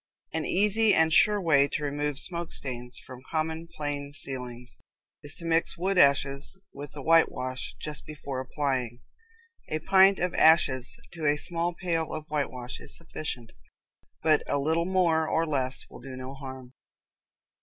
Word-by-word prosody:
An 160 -1 -1
easy 210 +3 +3
and 160 0 +4
sure 210 +4 +6
way 145 -6 +4
to 150 - -3
remove 145 0 -2
smoke 170 +2 0
stains 125 -2 -4
from 130 -1 -11
common 160 +1 -2
plain 145 -2 -4
ceilings 125 -4 -7 0.4
is 145 0 -3
to 170 - -6
mix 165 0 +1
wood 185 +2 +1
ashes 140 +4 +3
with 145 0 -9
the 145 - -8
whitewash 130 -5 +2
just 150 -1 -6
before 140 -3 -5
applying. 130 -3 -2 0.7
A 155 - 0
pint 190 +4 +5
of 180 0 -1
ashes 135 -6 +4
to 160 -3 -3
a 145 0 +3
small 170 +2 -1
pail 165 -3 -2
of 155 -1 -5
whitewash 130 -4 -3
is - - -7
sufficient, 135 -8 -6 0.7
but 155 -2 +4
a 145 - +1
little 160 +4 +1
more 170 -4 +2
or 165 +1 +1
less 130 -4 -1
will - - -12
do 130 0 -8
no 130 +1 -7
harm. 130 -2 -9
150 Hz, 155 wpm, -28 LUFS, 130-165 Hz, 0.7 s, sure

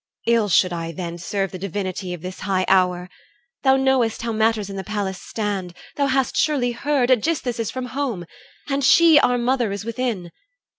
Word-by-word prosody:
Ill 230 -3 +2
should 185 0 +3
I 165 -1 -4
then 170 0 -6
Serve 195 +2 -2
the 185 - -7
divinity 190 -1 -4
of 175 -2 -7
this 185 +1 -7
high 190 -2 0
hour! 180 -1 +2 0.5
Thou 265 -1 +4
knowest 265 -4 +1
how 235 - -2
matters 220 -1 +1
in 195 - -7
the 190 - -4
palace 195 -1 -3
stand. 200 -5 -4 0.2
Thou 280 -1 +1
hast 265 -1 0
surely 275 -6 +1
heard, 260 +1 0
Aegisthus 255 -1 +1
is 225 - -1
from 255 -1 -4
home, 250 -11 -2 0.4
And 280 -1 -1
she, 330 +2 +7
our 245 -2 +3
mother, 240 -2 0
is 200 +1 -5
within. 230 -7 -3
220 Hz, 185 wpm, -22 LUFS, 185-255 Hz, 0.5 s, she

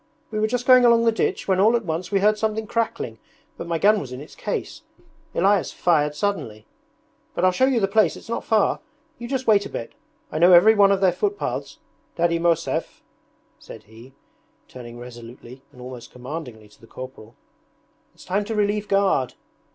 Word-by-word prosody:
'We 215 - -2
were 215 - +2
just 245 +2 -2
going 255 -1 +7
along 235 -1 +5
the 230 - +4
ditch 225 - -2
when 190 -1 +2
all 220 +4 +4
at 235 -3 -1
once 165 +3 -4
we 195 -1 +2
heard 210 +1 +4
something 220 0 -2
crackling, 230 +1 -3 0.4
but 170 - -8
my 170 -1 -1
gun 210 +5 +4
was 130 - -8
in 125 - -7
its 145 - -12
case. - - -5 0.5
Elias 195 +1 +2
fired 150 -4 +1
suddenly... 115 - -3 0.7
But 180 - +1
I'll 185 - +5
show 260 +8 +2
you 260 -3 +2
the 195 - +1
place, 200 -3 +2
it's - - -14
not 230 - -3
far. 220 -2 +1 0.4
You 235 - -6
just 260 0 -3
wait 205 -2 +3
a - - -16
bit. - - -7 0.4
I 155 - -3
know 175 +2 +6
every 205 +6 +7
one 200 -2 +5
of 195 -1 +1
their 190 -2 +4
footpaths... 410 - -3 0.4
Daddy 170 0 +1
Mosev,' 170 0 -1 0.6
said - - -12
he, 115 +5 -16 0.5
turning 120 -2 -11
resolutely 120 +1 -11
and 125 - -18
almost 125 -1 -10
commandingly 125 -4 -8
to - - -23
the 115 - -16
corporal, 130 -3 -11 0.8
'it's - - -16
time 200 +3 0
to 225 +1 -4
relieve 210 0 0
guard!' 195 -10 +1
190 Hz, 190 wpm, -23 LUFS, 130-215 Hz, 0.8 s, going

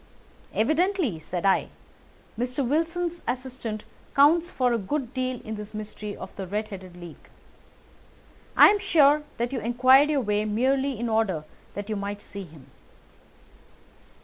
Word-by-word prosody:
"Evidently," 315 - +1
said 175 +3 -4
I, 195 - +3 0.7
"Mr. 250 +3 -1
Wilson's 335 +4 -1
assistant 245 -4 -4 0.3
counts 325 +5 +5
for 250 -7 +1
a 235 - +1
good 250 +5 -3
deal 255 -1 -2
in 220 -3 -5
this 210 0 -7
mystery 210 -1 -6
of - - -9
the 190 -2 -6
Red 210 +3 -3
headed 185 -3 -9
League. 175 -2 -12 1.3
I - - +10
am 415 0 +2
sure 300 -7 +4 0.2
that 240 +3 -2
you 255 - -1
inquired 255 +5 +5
your 290 -3 +2
way 210 -2 0
merely 260 +4 0
in 240 - -1
order 220 -8 0 0.3
that 205 0 -5
you 215 - -2
might 200 0 -4
see 200 -1 -8
him." 155 -5 -15
235 Hz, 150 wpm, -26 LUFS, 205-275 Hz, 1.3 s, I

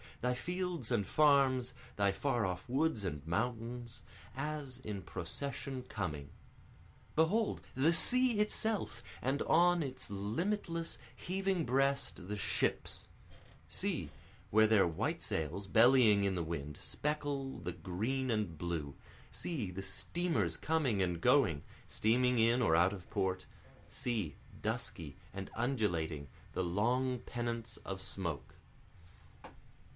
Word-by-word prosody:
thy 125 +1 +2
fields 175 -4 -3
and 110 -5 +2
farms, 135 -4 +4 0.2
thy 100 -1 +3
far 120 +3 0
off 90 +2 -3
woods 135 -4 +1
and 75 -6 -4
mountains, 115 +5 -2 0.3
As 140 -2 -3
in 105 -6 -5
procession 130 +9 -3
coming. 80 - -4 0.9
Behold, 200 +8 +2
the 145 +6 +4
sea 250 +4 +4
itself, 210 - 0 0.2
And 135 +3 0
on 175 +1 +4
its 130 -2 -5
limitless, 165 - -1 0.2
heaving 190 -2 -1
breast, 135 -6 +1
the 105 - -2
ships; - - -1 0.6
See, - - -2 0.4
where 110 +1 +6
their 105 -4 +5
white 80 - -1
sails, 80 +6 -2
bellying 115 -2 +6
in 100 -1 +2
the 85 - -1
wind, 75 -3 -4
speckle 145 -2 -2
the 90 +1 -3
green 105 +11 -2
and 105 -7 -1
blue, 80 -5 -3 0.4
See, 135 - -3
the 95 +2 -5
steamers 100 - -1
coming 145 -11 +1
and 90 -2 0
going, 120 - +4 0.2
steaming 125 +3 +2
in 115 +2 +4
or 80 -9 +4
out 90 +4 +4
of 95 -3 -9
port, 95 -1 0 0.4
See, 105 - -2 0.3
dusky 75 -5 -2 0.2
and 95 0 -6
undulating, 85 - 0 0.3
the 95 - 0
long 120 +8 +1
pennants 120 -1 -4
of 95 -1 -6
smoke. 80 -8 -4
115 Hz, 120 wpm, -35 LUFS, 95-140 Hz, 0.9 s, where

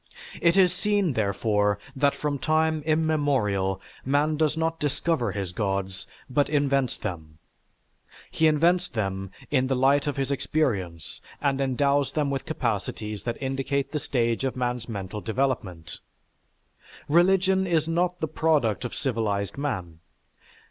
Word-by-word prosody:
_") - - -11
It 170 +2 +4
is 180 -2 +5
seen, 205 -5 +1
therefore, 105 -1 +1 0.2
that 140 +1 +2
from 145 -2 -2
time 155 +1 +1
immemorial, 140 - +1 0.2
man 145 +3 +2
does 155 0 +1
not 165 0 -1
discover 145 -4 0
his 95 -3 -4
gods, 95 -1 -2 0.2
but 140 +2 +1
invents 140 -3 +1
them. 80 -6 -6 0.9
He 160 - +3
invents 170 +4 +3
them 95 - -3 0.2
in 130 -2 +2
the 135 - +1
light 140 +3 +3
of 145 - -2
his 135 0 -1
experience 100 - -1 0.2
and 140 -1 0
endows 140 +1 +1
them 145 -2 0
with 135 - -3
capacities 110 -6 -2
that 120 -1 -3
indicate 135 +1 -1
the 150 - -1
stage 120 -3 0
of 130 - -1
man's 125 -1 -2
mental 100 -1 -5
development. 110 -9 -2 1.1
Religion 190 +3 +3
is 160 -3 +1
not 175 +2 0
the 160 - 0
product 145 - +1
of 120 - -4
civilized 105 -6 -1
man. 95 - -4
135 Hz, 140 wpm, -26 LUFS, 105-155 Hz, 1.1 s, is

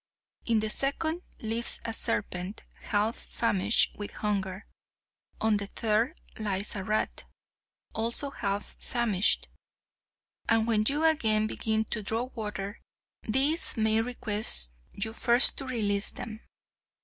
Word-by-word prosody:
In 225 -2 +1
the 215 - -2
second 315 +7 +2 0.2
lives 230 +1 -1
a 225 - -4
serpent 180 - -2 0.3
half 215 +2 0
famished 210 -1 +1
with 205 -1 -6
hunger. 195 -2 -4 0.7
On 220 -1 +1
the 200 0 -5
third 225 - -2 0.2
lies 205 -1 -2
a 195 - -5
rat, 215 +3 -3 0.7
also 235 +5 +1
half 200 -4 -5
famished, 225 -5 +2 1.0
and 225 -1 +2
when 215 -2 +1
you 295 +3 +3
again 220 -9 +2
begin 220 0 -2
to 220 - -1
draw 225 +3 -3
water 210 -2 -7 0.4
these 270 +6 +4
may 220 0 +1
request 215 - 0 0.2
you 220 +2 -3
first 240 +2 +8
to 270 - -5
release 205 -5 0
them. 220 -3 -8
220 Hz, 125 wpm, -27 LUFS, 205-235 Hz, 1.0 s, first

